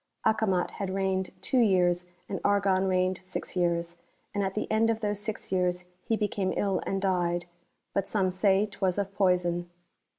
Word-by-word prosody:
Acomat 195 -5 +2
had 190 -2 -4
reigned 190 -1 0
two 260 - +1
years, 180 -5 +3 0.2
and 195 - -4
Argon 195 -2 +3
reigned 185 0 +1
six 185 +1 -5
years; 170 -1 0 0.4
and 205 - 0
at 190 0 -2
the 215 - -1
end 220 +1 +3
of 225 0 0
those 205 -1 -1
six 215 -1 -5
years 180 -1 0 0.2
he 225 - 0
became 205 -3 -1
ill 195 -3 +1
and 195 - 0
died; 175 -3 0 0.5
but 195 -1 0
some 190 -3 +1
say 195 +2 +3
'twas 195 -3 -1
of 200 -1 -2
poison. 180 -3 +1
190 Hz, 170 wpm, -28 LUFS, 180-205 Hz, 0.5 s, years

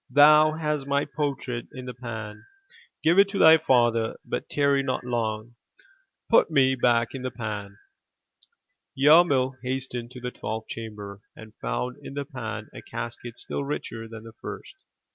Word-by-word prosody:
Thou 150 +1 +7
hast 150 -3 -2
my 140 +1 +1
portrait 135 -5 -3
in 130 -3 -8
the 125 - -6
pan; 110 -3 -7 0.6
give 170 +4 +5
it 200 0 +6
to 200 - -4
thy 160 -3 +8
father, 120 -6 +2
but - - -4
tarry 140 -1 +2
not 130 -2 -2
long. 115 -2 -2 0.7
Put - - +5
me 135 -4 +4
back 120 -2 +2
in 135 - -5
the 130 - -2
pan." 105 -4 -6 1.2
Yarmil 135 -3 +5
hastened 125 -2 -3
to 125 0 -10
the 125 0 -4
twelfth 110 -1 -5
chamber, 105 -3 -7 0.2
and 110 -1 -12
found 125 0 -2
in 135 - -9
the 140 0 -3
pan 110 -5 -6
a - - -9
casket 115 +1 -6
still - - -4
richer 115 -5 -5
than 115 -1 -10
the 115 -1 -11
first. - - -7
125 Hz, 160 wpm, -26 LUFS, 115-140 Hz, 1.2 s, thy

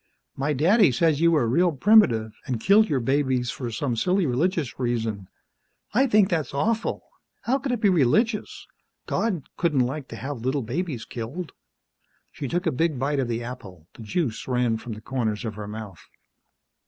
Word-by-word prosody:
"My 145 +2 -1
daddy 175 - +4
says 155 +3 +2
you 170 - +5
were 150 -8 +2
real 170 +9 +3
primitive, 130 - +4 0.2
an' 125 -3 -1
killed 200 - +4
your 140 -4 +1
babies 130 -1 0
for 125 -3 -5
some 120 +2 -2
silly 180 - +1
religious 145 +2 -1
reason. 115 -6 -2 0.7
I 265 +5 +4
think 210 -4 +4
that's 155 -7 -2
awful! 220 +10 -1 0.4
How 265 +4 +1
could 275 -1 -3
it 240 -3 -2
be 205 - +4
religious? 205 - +1 0.4
God 190 -10 -1
couldn't 150 -7 +2
like 135 +2 -5
to - - -8
have 130 +3 -6
little 130 +2 -1
babies 135 +1 -3
killed!" 130 +8 -6 0.8
She 140 - -5
took 175 +7 -2
a 165 - +2
big 155 +1 0
bite 140 +2 0
of 130 - 0
the 120 0 -2
apple; 95 -9 -9
the - - -13
juice 115 - -2
ran 125 -3 +1
from 115 +1 -7
the 105 - -9
corners 115 -2 -2
of 110 - -3
her 105 0 -7
mouth. 105 -6 -8
135 Hz, 180 wpm, -25 LUFS, 115-175 Hz, 0.8 s, you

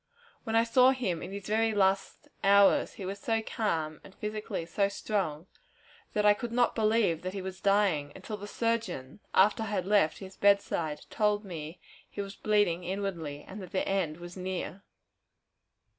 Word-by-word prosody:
When 225 -1 -1
I 230 - +6
saw 250 +2 +5
him 190 -11 -2
in - - -6
his 200 0 -6
very 220 +1 +1
last 195 -1 +1 0.2
hours, 200 0 +5
he 195 - -7
was 195 +2 -4
so 225 +1 0
calm, 160 -10 -2
and 195 - -14
physically 210 -5 -4
so 200 +4 +1
strong, 185 -7 -2 0.7
that 210 0 +1
I 210 - +8
could 235 +3 -5
not 245 0 +2
believe 215 -7 +2
that 185 +2 -5
he 195 - -3
was 190 0 -7
dying, 195 -8 +2
until 200 +3 -6
the 205 0 -8
surgeon, 210 - -2 0.2
after 205 +4 +5
I 220 - -2
had 200 -3 -1
left 195 -6 +3
his 190 -1 -10
bedside, 185 -6 +2
told 210 -1 +1
me 165 -2 -7 0.3
he - - -10
was 200 -1 -4
bleeding 205 -5 +1
inwardly, 175 -6 -4
and 200 +2 -8
that 185 +1 -10
the 190 - 0
end 180 -6 0
was 175 0 -9
near. 185 +1 -4
195 Hz, 175 wpm, -30 LUFS, 180-210 Hz, 0.7 s, I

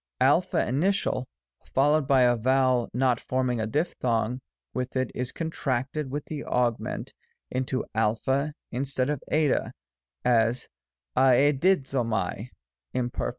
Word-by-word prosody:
Alpha - - +3
initial, 140 - 0 0.4
followed 145 +1 +2
by 135 -3 +5
a 120 0 +4
vowel 130 +1 +2
not 125 -1 +2
forming 130 -2 -1
a 110 - -1
diphthong 125 -3 -1 0.3
with 125 +1 -3
it, 130 -1 0
is 125 0 -3
contracted 140 -3 -2
with 145 +2 -4
the 150 -2 -5
augment 120 -2 -1 0.4
into 130 +1 -1
a 110 -1 +3 0.6
instead 130 +1 -1
of 145 - -3
77; 150 -3 +1 0.5
as, 115 0 +2 0.5
a^Si^ 140 +6 +4
o/^aiy 115 -4 -2 0.5
Imperf. 125 -1 -1
130 Hz, 115 wpm, -27 LUFS, 120-140 Hz, 0.6 s, by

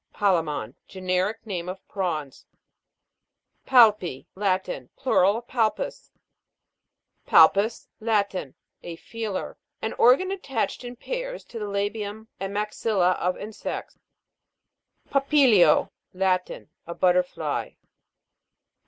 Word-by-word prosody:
PALJE'MON. 165 - 0
Generic 185 +3 -2
name 180 -4 -4
of 190 +1 -8
prawns. 160 -8 -4 1.2
PAL'PI. 210 - +4
Latin. 185 -9 -2
Plural 200 -4 +3
of 240 - -9
Palpus. 255 - -1 1.2
PAL' - - +8
PUS. 210 +4 -2
Latin. 200 - -1 0.3
A 170 - -7
feeler. 220 +1 -5 0.2
An 220 - -3
or 245 +2 +8
gan 375 0 -4
attached 265 - -3
in 245 0 -7
pairs - - -5
to 235 - -8
the 210 - -4
labium 205 +2 -3
and 195 +1 -4
maxilla 210 -2 +1
of 180 +1 0
insects. 215 +1 -6 1.1
PAPI'LIO. 270 - +4 0.2
Latin. 185 - -1 0.2
A 170 - -6
butterfly. 180 0 0
200 Hz, 100 wpm, -25 LUFS, 180-225 Hz, 1.2 s, PAL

